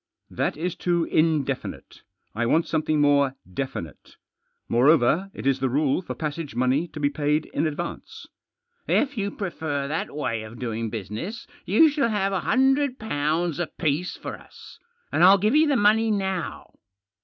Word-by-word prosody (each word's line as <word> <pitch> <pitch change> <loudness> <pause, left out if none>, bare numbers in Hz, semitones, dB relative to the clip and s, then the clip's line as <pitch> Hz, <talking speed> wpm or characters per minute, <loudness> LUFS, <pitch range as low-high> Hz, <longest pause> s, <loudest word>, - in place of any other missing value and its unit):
" - - -54
That - - 0
is 175 +3 -2
too 175 -1 0
indefinite. 155 -5 -1 0.3
I 115 +2 -1
want 165 +7 +3
something 155 -1 0
more 140 -2 +3
definite. 90 - -6 0.5
Moreover, 150 +8 +3
it - - -9
is 135 -1 +2
the 130 0 0
rule 140 +4 +1
for 180 - -6
passage 155 -3 -5
money 130 +7 +1
to 155 - -9
be 145 -1 +1
paid 150 +1 0
in 155 +3 +1
advance." 155 +3 -6 0.3
" 475 0 -47 0.2
If 285 0 -7
you 200 -3 -1
prefer 160 -8 -3
that 155 +3 -2
way 115 -7 -2
of 110 +2 -10
doing 115 -2 -3
business 110 - -6 0.2
you 220 - +6
shall 285 -5 +1
have 195 -2 0
a 190 - +1
hundred 265 - +2
pounds 165 -3 -1
apiece 165 0 -2
for - - -7
us, - - -15 0.3
and - - +2
I'll 190 +2 +8
give 215 +7 +1
you 310 +1 +5
the 285 - +2
money 220 +2 +4
now." 190 -4 -3
160 Hz, 165 wpm, -24 LUFS, 140-195 Hz, 0.5 s, I'll